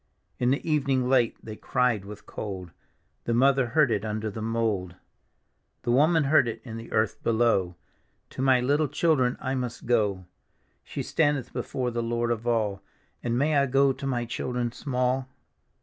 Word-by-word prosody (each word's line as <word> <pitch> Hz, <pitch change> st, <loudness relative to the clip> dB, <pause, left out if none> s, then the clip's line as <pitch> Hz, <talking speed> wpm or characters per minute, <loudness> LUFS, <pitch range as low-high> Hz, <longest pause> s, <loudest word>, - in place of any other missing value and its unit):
In 125 Hz, -, +2 dB
the 140 Hz, -, +1 dB
evning 135 Hz, -5 st, +1 dB
late 125 Hz, -3 st, +2 dB
they 110 Hz, -, -6 dB
cried 115 Hz, -4 st, 0 dB
with 105 Hz, +1 st, -10 dB
cold, 95 Hz, -5 st, -6 dB, 0.5 s
The 115 Hz, -, 0 dB
mother 135 Hz, 0 st, +4 dB
heard 135 Hz, +1 st, +3 dB
it 105 Hz, -2 st, 0 dB
under 110 Hz, 0 st, -3 dB
the 110 Hz, -, -6 dB
mould. 110 Hz, -5 st, -1 dB, 0.9 s
The 120 Hz, -, 0 dB
woman 155 Hz, +5 st, +4 dB
heard 140 Hz, -3 st, +4 dB
it 115 Hz, -1 st, -4 dB
in 115 Hz, -3 st, -7 dB
the 115 Hz, +1 st, -9 dB
earth 110 Hz, -1 st, 0 dB
below: 110 Hz, -6 st, +2 dB, 0.3 s
" -, -, -44 dB
To -, -, -5 dB
my 130 Hz, -2 st, +4 dB
little 145 Hz, +4 st, +2 dB
children 130 Hz, -5 st, +1 dB
I 130 Hz, -, -2 dB
must 125 Hz, -3 st, -4 dB
go." 105 Hz, -6 st, +1 dB, 0.6 s
She -, -, -5 dB
standeth 145 Hz, -5 st, 0 dB
before 125 Hz, -2 st, -2 dB
the 120 Hz, 0 st, -2 dB
Lord 120 Hz, 0 st, -1 dB
of 115 Hz, 0 st, -3 dB
all: 105 Hz, -4 st, 0 dB, 0.2 s
" -, -, -40 dB
And 120 Hz, 0 st, 0 dB
may 150 Hz, +3 st, +2 dB
I 140 Hz, -, +2 dB
go 135 Hz, +1 st, +3 dB
to 135 Hz, -, -6 dB
my 120 Hz, -3 st, -1 dB
children 125 Hz, 0 st, -2 dB
small? 130 Hz, 0 st, -1 dB
120 Hz, 180 wpm, -27 LUFS, 110-135 Hz, 0.9 s, mother